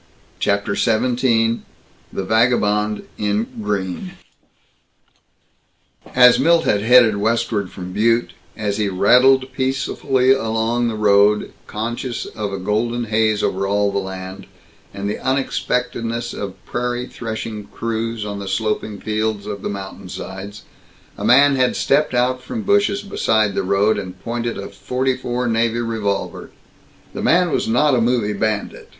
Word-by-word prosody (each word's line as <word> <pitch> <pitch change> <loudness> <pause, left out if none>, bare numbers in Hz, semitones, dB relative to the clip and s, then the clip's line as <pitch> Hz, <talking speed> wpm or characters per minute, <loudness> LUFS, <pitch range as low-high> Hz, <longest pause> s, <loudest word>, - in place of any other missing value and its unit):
CHAPTER 100 0 0
XVII 115 0 +2 0.5
THE 95 - -3
VAGABOND 105 -1 +2 0.2
IN 105 +1 0 0.2
GREEN 105 - -3 2.0
As 125 -1 +7
Milt 165 +4 +4
had 100 - +2
headed 115 -2 +5
westward 110 -2 0
from 90 -1 -8
Butte, 115 +3 +2 0.3
as 105 -2 -2
he 105 -2 0
rattled 130 +7 +4
peacefully 130 0 +1
along 115 -1 +1
the 115 - -2
road, 105 0 +3
conscious 120 +3 -4
of 100 -3 -5
golden 115 +3 0
haze 110 -1 +1
over 95 +1 0
all 100 0 +1
the 100 - 0
land, 95 0 -7 0.4
and 100 0 -5
the 105 - -3
unexpectedness 120 -3 -1
of 100 -2 -5
prairie 125 0 -2
threshing 110 -3 -6
crews 115 -1 -3
on 100 -1 -5
the 100 - -6
sloping 105 +1 -2
fields 110 -1 -2
of 100 -2 -5
mountainsides, 95 0 -7 0.5
a - - -7
man 140 +2 +5
had 125 -1 +2
stepped 140 -2 +1
out 125 +1 +1
from 220 - -5
bushes 200 0 +2
beside 110 - +1
the - - 0
road, 100 +3 +2
and 95 -1 -8
pointed 120 0 -3
a 100 - -5
.44 125 +4 -2
navy 115 0 +1
revolver. 100 -6 -3 0.6
The - - -5
man 175 0 +3
was - - 0
not 135 +6 +3
a 125 - +3
movie 115 -3 +1
bandit. 105 0 -3
110 Hz, 130 wpm, -20 LUFS, 100-125 Hz, 2.0 s, As